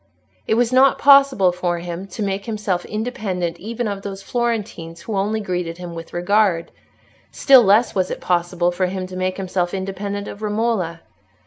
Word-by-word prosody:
It - - +2
was 240 +1 +1
not 265 +1 +5
possible 275 -9 +6
for 175 -1 -2
him 175 +2 -6
to 200 +3 -5
make 195 +1 -3
himself 210 -5 -2
independent 210 -7 -3
even 230 +3 -4
of 200 -1 -4
those 195 -1 -7
Florentines 210 -9 -3
who 210 +4 -5
only 205 +3 0
greeted 180 -4 -3
him 175 -1 -7
with 165 0 -8
regard; 180 -1 +1 0.6
still 270 -3 +6
less 215 +3 +4
was 185 -1 0
it - - -4
possible 175 0 0
for 185 +1 0
him 185 0 -4
to 185 0 -9
make 185 0 -2
himself 185 -1 -2
independent 200 +1 -4
of 205 - -9
Romola. 210 -6 -1
195 Hz, 175 wpm, -20 LUFS, 180-220 Hz, 0.6 s, possible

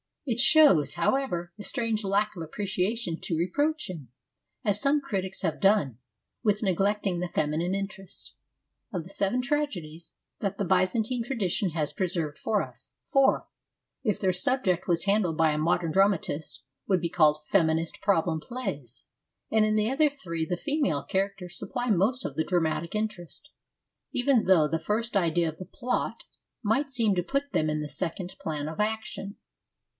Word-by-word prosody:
It 240 -4 -1
shows, 270 - +6
however, 175 -2 0
a - - -6
strange 230 -2 -1
lack 205 +2 +1
of 170 - -6
appreciation 190 +2 -2
to 165 - -2
reproach 290 - 0
him, 155 -9 -8 0.5
as 205 -3 +1
some 285 +2 +3
critics 190 -6 -3
have 165 -4 -1
done, 195 - +3 0.4
with 210 0 +1
neglecting 195 -1 +1
the 180 - -1
feminine 160 +3 0
interest. 195 -1 -7 0.6
Of 175 -3 -2
the 175 - -12
seven 200 +5 0
tragedies 190 - -3 0.2
that 200 -1 -2
the 200 - -1
Byzantine 215 +7 +1
tradition 205 -6 -1
has 155 -2 -1
preserved 170 -5 -2
for 215 -2 +1
us, - - -12
four, 275 -2 +3 0.6
if 215 -5 0
their 190 -2 +2
subject 185 -2 +1
was 170 0 +1
handled 200 -6 +2
by 160 -1 +4
a 150 - -1
modern 165 +1 +1
dramatist, 180 -6 +1 0.2
would 185 -3 +2
be 170 - -1
called 155 -3 +3
feminist 160 -3 +1
problem 165 -5 +2
plays, 150 - -6 0.5
and 220 -1 +4
in 215 0 +1
the 215 +1 +2
other 300 +2 +4
three 170 - -4
the 175 +2 -2
female 280 - 0
characters 195 -2 -2
supply 245 -2 -3
most 220 +6 +2
of - - -4
the 160 - +2
dramatic 170 0 0
interest, 210 - -4 0.6
even 250 -2 +2
though 175 -5 +5
the 165 +2 -1
first 220 +7 -2
idea 170 -2 +2
of 160 - -8
the 185 - -7
plot 250 +7 -3 0.4
might 270 +7 +1
seem 230 -6 +2
to 180 - +2
put 280 +8 -2
them 155 - +1
in 150 0 -1
the 150 - -5
second 180 +2 -3
plan 150 -2 -3
of 160 +4 -6
action. 210 -2 -2
190 Hz, 165 wpm, -28 LUFS, 165-220 Hz, 0.6 s, shows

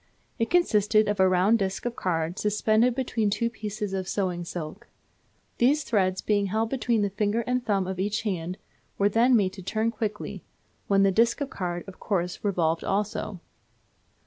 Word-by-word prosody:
It 230 - 0
consisted 215 - +3
of 205 -1 -1
a 190 0 +5
round 190 +5 +3
disc 195 +2 -2
of 240 -1 -2
card 165 0 -2
suspended 215 +3 +2
between 235 -5 0
two 230 +3 0
pieces 210 -2 -5
of 190 -1 -2
sewing 180 -4 -1
silk. 175 +6 -7 0.7
These 280 +5 +3
threads 190 -6 +1
being 205 -2 +1
held 220 +3 -1
between 235 -4 +1
the 200 - -1
finger 210 +3 0
and 250 0 0
thumb 200 -4 +1
of 185 0 -4
each 205 +3 -1
hand, 180 -3 -3 0.4
were 200 +1 +3
then 235 +4 +4
made 195 -4 +2
to 190 - -9
turn 220 +4 -1
quickly, 215 -2 -4 0.4
when 195 -1 +4
the 195 - +4
disc 230 +7 +3
of 285 -2 -3
card, 175 -1 -3
of 195 - -11
course, 180 -4 -2
revolved 170 -5 +1
also. 200 -1 -2
205 Hz, 175 wpm, -26 LUFS, 190-225 Hz, 0.7 s, a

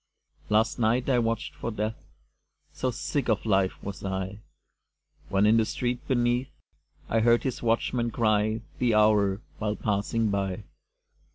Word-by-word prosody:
Last 110 +4 +2
night 120 +2 +2
I 125 - +4
watched 115 -1 -1
for - - -5
Death 110 0 -2 0.8
So 130 - -1
sick 125 +2 -2
of 110 -1 +1
life 95 -3 +2
was 100 0 -6
I! 95 +1 -3 0.9
When 100 +1 +3
in 110 +2 +5
the 115 - +4
street 125 +2 -3
beneath 120 +1 +1 0.6
I 115 - +1
heard 120 +1 +4
his 130 -2 -3
watchman 120 +1 +1
cry 110 0 +1 0.2
The 120 -3 +2
hour, 105 -2 +3 0.2
while 105 -1 -1
passing 105 +1 0
by. 100 0 -2
110 Hz, 145 wpm, -27 LUFS, 105-120 Hz, 0.9 s, in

